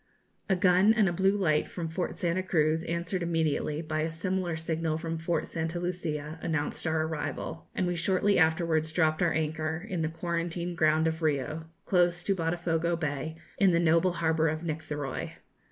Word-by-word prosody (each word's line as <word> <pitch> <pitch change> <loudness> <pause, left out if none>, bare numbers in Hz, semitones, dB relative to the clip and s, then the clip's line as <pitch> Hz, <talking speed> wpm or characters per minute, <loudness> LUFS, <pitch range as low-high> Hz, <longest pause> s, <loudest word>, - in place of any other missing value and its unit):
A 190 - +4
gun 185 +4 +5
and 215 -4 +4
a 175 - 0
blue 195 +3 +2
light 155 -6 +2
from 170 -2 -4
Fort 170 +3 -3
Santa 175 +1 0
Cruz, 160 -3 +1
answered 170 +2 -2
immediately 160 -2 0
by 155 -1 -2
a 160 - 0
similar 175 0 -2
signal 160 -1 -1
from 165 0 -4
Fort 165 +1 -1
Santa 165 +1 -3
Lucia, 160 -3 -3
announced 155 0 -2
our 160 0 +1
arrival, 160 +1 -4
and 185 - +1
we 175 0 0
shortly 190 +3 +2
afterwards 160 -1 +2
dropped 155 -1 +2
our 175 -2 +3
anchor 160 +3 -2
in 180 -6 -2
the 160 - 0
quarantine 170 +1 -3
ground 155 -1 +3
of 160 +1 -1
Rio 155 +1 -1 0.2
close 175 -1 +2
to 200 - +2
Botafogo 170 0 0
Bay, 150 0 -3 0.2
in 195 -3 +5
the 170 - +4
noble 170 +2 +3
harbour 160 -1 +1
of 155 +1 -2
Nictheroy. 150 -4 -4
165 Hz, 175 wpm, -29 LUFS, 160-175 Hz, 0.2 s, gun